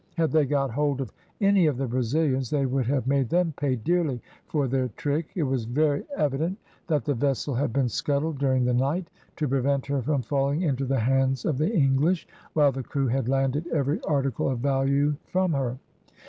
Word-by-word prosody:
Had 165 -2 +2
they 155 -2 +4
got 135 -2 0
hold 145 +2 0
of 130 -5 -5 0.3
any 200 -4 +4
of 145 -5 0
the 135 - -1
Brazilians 130 +2 0
they 145 -2 +1
would 130 -2 0
have 135 -2 0
made 135 -2 +1
them 175 0 +1
pay 140 -2 0
dearly 150 +1 0 0.3
for 145 -3 0
their 130 0 0
trick. 150 +2 -1
It 175 - 0
was 130 -4 -1
very 145 +4 +1
evident 150 +6 0 0.3
that 150 -4 0
the 145 - +1
vessel 140 +2 -1
had 130 +1 0
been 130 +1 +1
scuttled 145 +4 -1
during 130 -2 +2
the 125 - +1
night, 140 +8 0 0.2
to 150 - -1
prevent 135 +1 +1
her 140 -1 -1
from 140 0 0
falling 140 +6 0
into 135 -4 0
the 130 -2 0
hands 135 +2 +1
of 145 -4 0
the 155 +7 +1
English, 155 0 +2 0.3
while 145 -3 +4
the 135 0 -4
crew 135 +1 -1
had 130 0 0
landed 135 +4 0
every 145 -2 0
article 135 -4 0
of 130 - -1
value 140 +3 +1
from 185 -2 +1
her. 130 -3 -1
140 Hz, 200 wpm, -26 LUFS, 130-150 Hz, 0.3 s, they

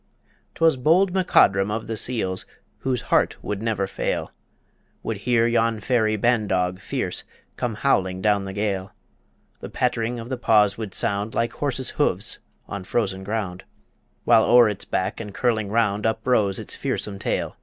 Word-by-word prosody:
'Twas 165 -4 +3
bold 175 +8 +3
MacCodrum 100 - +4
of 110 +1 -3
the 115 - -4
Seals, 105 -5 -2 0.3
Whose 130 -3 -1
heart - - +3
would 105 -1 -3
never 110 -4 0
fail, 95 - -3 0.7
Would 110 - -3
hear 115 +2 +2
yon 115 -1 +1
fairy 110 -1 +1
ban 115 0 +2
dog 90 -1 0
fierce - - -3 0.3
Come 120 -3 -2
howling 95 -7 +1
down 100 0 +1
the 95 - -5
gale; 100 -2 -2 0.7
The - - -7
patt'ring 120 -1 -1
of 115 - -7
the 130 0 -3
paws 105 -4 +4
would 110 -4 -6
sound 100 +2 -1
Like 115 +1 0
horse's 135 -3 -3
hoofs - - -1 0.3
on 100 -1 -5
frozen 95 -1 -1
ground, 100 -3 -3 0.6
While 115 -2 +6
o'er 120 -1 +6
its 105 -1 -4
back 95 +3 -2
and 105 -3 -7
curling 110 -5 0
round 105 -1 +1
Uprose 110 -3 +1
its - - -4
fearsome 100 -2 -3
tail. - - -2
110 Hz, 160 wpm, -23 LUFS, 100-120 Hz, 0.7 s, While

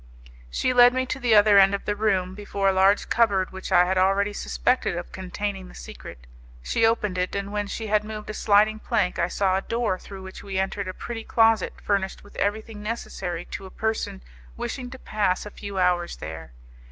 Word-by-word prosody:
She 255 - 0
led 245 0 +7
me 260 0 +1
to 260 - -4
the 240 -4 +3
other 205 -1 +7
end 195 +1 +5
of 200 - -7
the 205 - 0
room, 195 -4 0
before 200 0 -2
a - - +5
large 190 +2 +3
cupboard 200 -5 +2
which 190 +1 -7
I 180 -1 +6
had 185 +1 +1
already 195 +2 +2
suspected 250 -1 0
of 175 - -6
containing 190 +1 -4
the - - -14
secret. - - -10 0.4
She 225 - +2
opened 210 -5 0
it, 180 +2 -1
and 200 0 -3
when 205 -1 -1
she 220 +2 -5
had 210 0 +2
moved 215 0 -7
a - - -7
sliding 215 +1 +3
plank 180 -5 0
I 170 - +2
saw 190 0 +1
a - - -1
door 230 -4 -1
through 195 -1 -10
which 190 0 -9
we 195 -1 -5
entered 190 +1 -1
a 185 - -4
pretty 230 -1 -6
closet 225 -3 +3
furnished 195 -2 -1
with 205 - -17
everything 215 +1 -2
necessary 190 -6 -4
to 195 - -6
a - - -11
person 220 - -3 0.3
wishing 250 -2 -4
to 260 - -9
pass 210 -6 -1
a 210 - -8
few 200 -1 -7
hours 180 -1 +1
there. 80 -5 -8
200 Hz, 210 wpm, -25 LUFS, 185-215 Hz, 0.4 s, led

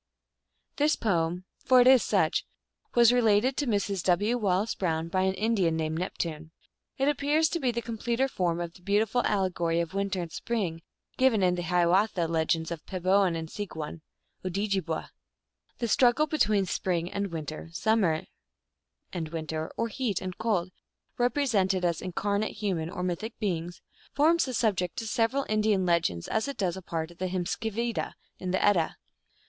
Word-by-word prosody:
This 300 +2 +3
poem 175 -3 0 0.2
for 255 -1 +6
it 245 - +6
is 260 -1 +7
such - - +1 0.5
was 240 0 +6
related 235 +1 +3
to 290 - 0
Mrs. 200 -3 0
W. 205 +6 +2
Wallace 205 -1 +1
Brown 165 -3 -1
by 185 +2 +1
an 190 0 +1
Indian 200 -6 +1
named 160 0 -2
Neptune. 160 -3 -4 0.5
It 270 0 +1
appears 295 +2 +2
to 340 - -2
be 260 - +1
the 235 -1 -2
completer 235 +3 -1
form 175 -8 -1
of 170 -1 -4
the 180 - -17
beautiful 210 +5 +1
allegory 175 -4 +1
of 170 +1 -2
Winter 195 -1 -1
and 170 -2 -4
Spring 185 -8 -2 0.4
given 250 -6 +3
in 180 -1 +4
the 180 - -2
Hiawatha 175 +1 +2
Legends 160 0 0
as 165 -3 -4
Peboan 185 -1 +1
and 165 0 -4
Seegwum 160 -4 -6 0.4
(Odjibwa). 190 -3 -2 0.7
The 235 - -2
struggle 245 +6 +4
between 215 -10 +2
Spring 175 -1 -1
and 200 0 -2
Winter, 155 0 -6
Summer 185 -4 +1 0.9
and 165 -4 -3
Winter, 160 -1 -4
or 230 - 0
Heat 230 -3 -2
and 185 -1 -5
Cold, 200 -6 0 0.5
represented 220 -8 +2
as 170 -2 0
incarnate 200 +3 -1
human 185 -6 -2
or 180 0 -5
mythic 185 +6 -3
beings, 175 -4 -3 0.3
forms 325 +4 +4
the 255 -2 -4
subject 200 -1 0
of 220 - -4
several 255 +4 +1
Indian 215 -3 +2
legends, 165 - +1
as 220 +4 0
it 280 - -5
does 185 -5 0
a 190 - -7
part 165 -1 -4
of 170 - -18
the 185 - -1
Hymiskvida, 220 +5 -2 0.3
in 185 - -4
the 185 - +1
Edda. 185 -6 +2
190 Hz, 165 wpm, -28 LUFS, 170-225 Hz, 0.9 s, is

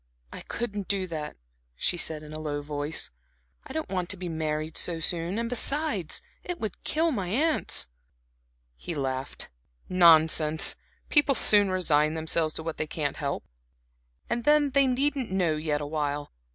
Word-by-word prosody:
"I - - -7
couldn't 205 -5 -4
do 195 -2 0
that," 155 -4 -6 0.4
she 175 - 0
said 160 -3 -2
in 155 0 -10
a 155 - -6
low 145 -2 -3
voice. 145 +1 -3 0.6
"I - - -9
don't 315 -6 -4
want 180 -2 -2
to 200 - 0
be 180 -1 -5
married 155 -1 -3
so 170 -2 0
soon; 170 +3 0
and 230 0 -1
besides 245 - +1 0.2
it 355 -1 -4
would 215 -4 -5
kill 325 +2 +1
my 200 -9 -2
aunts." 295 - +2 0.9
He 165 - -6
laughed. 135 -2 -3 0.4
"Nonsense! 160 -3 +5 0.3
People 290 -2 +4
soon 205 -4 +5
resign 155 -4 +2
themselves 160 0 0
to 160 - -3
what 165 -1 -4
they 155 - -2
can't 150 -2 -3
help. - - -3 0.8
And 235 - -2
then 295 0 +4
they 275 0 +4
needn't 270 0 0
know 180 -4 +1
yet 150 -1 -1
awhile. 145 -1 -3
170 Hz, 160 wpm, -27 LUFS, 155-230 Hz, 0.9 s, Nonsense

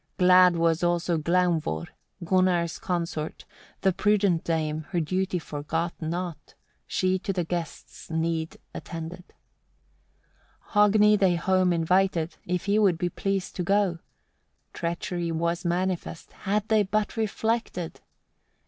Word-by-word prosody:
Glad 180 -1 +6
was 165 0 +2
also 175 -1 +1
Glaumvor, 170 - +1 0.4
Gunnar's 180 -1 +1
consort, 165 -3 -3 0.4
the 190 - +3
prudent 200 -4 +2
dame 155 -2 -2
her 175 - 0
duty 185 +3 -1
forgot 160 +2 -3
not, 170 +1 -5 0.3
she 185 0 +1
to 195 - -3
the 180 -2 -1
guests' 170 -1 -6
need 160 0 -2 0.2
attended. 165 +2 -7 1.5
7. 210 -1 +5
Hogni 210 -1 +5
they 185 -3 +4
home 185 +1 +2
invited, 170 0 +1
if 180 0 -1
he 205 +1 +2
would 195 -6 +3
be 175 +1 -1
pleased 195 +1 -2
to - - -1
go. 195 -2 +1 0.7
Treachery 170 0 -3
was 170 +2 -1
manifest, 175 -1 -2
had 210 +1 -2
they 220 -1 +4
but 210 +1 -1
reflected! 220 -5 -2
175 Hz, 120 wpm, -26 LUFS, 165-190 Hz, 1.5 s, Glad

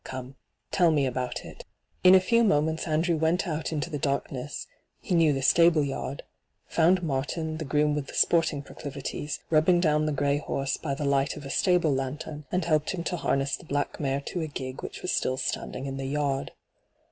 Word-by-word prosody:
Come, 130 0 -7 0.4
tell 175 -3 +4
me 150 -3 +2
all - - +1
about 125 0 -4
it.* - - -10 0.4
In 185 +1 +9
a - - +8
few 230 +5 +3
moments 160 -4 +1
Andrew 165 +2 +1
went 165 +4 +1
out 155 -1 -2
into 150 -1 -2
the 145 - -3
darkness 140 -1 -3 0.2
— - - -48
he - - -3
knew 165 -3 +5
the 135 -1 -1
stable 165 +1 +5
yard 140 0 -4 0.2
— - - -49
found 175 +3 +4
Martin, 155 +2 -2
the 160 - -4
groom 150 +1 +2
with 145 -2 -3
the - - -9
sporting 160 -4 +2
pro - - -14
clivities, 145 +1 -5
rubbing 165 +3 +4
down 155 -3 +2
the - - +1
gray 145 0 +1
horse 135 -2 -2
by 140 -3 -3
the 145 - -3
light 140 +1 +1
of 145 - -9
a 135 - -5
stable 180 -5 +3
lantern, 145 +3 -4
and 180 -2 0
helped 155 +2 +1
him 170 - -4
to 180 - -2
harness 135 -3 0
the - - -14
black 145 -2 -2
mare 140 -1 -1
to 175 - -5
the 160 - -2
gig 130 -3 -6
which - - -7
was - - -1
still 130 - 0
standing 130 0 -3
in 135 -1 -4
the 135 - -4
yard. 140 -1 -1
150 Hz, 215 wpm, -27 LUFS, 140-165 Hz, 0.4 s, In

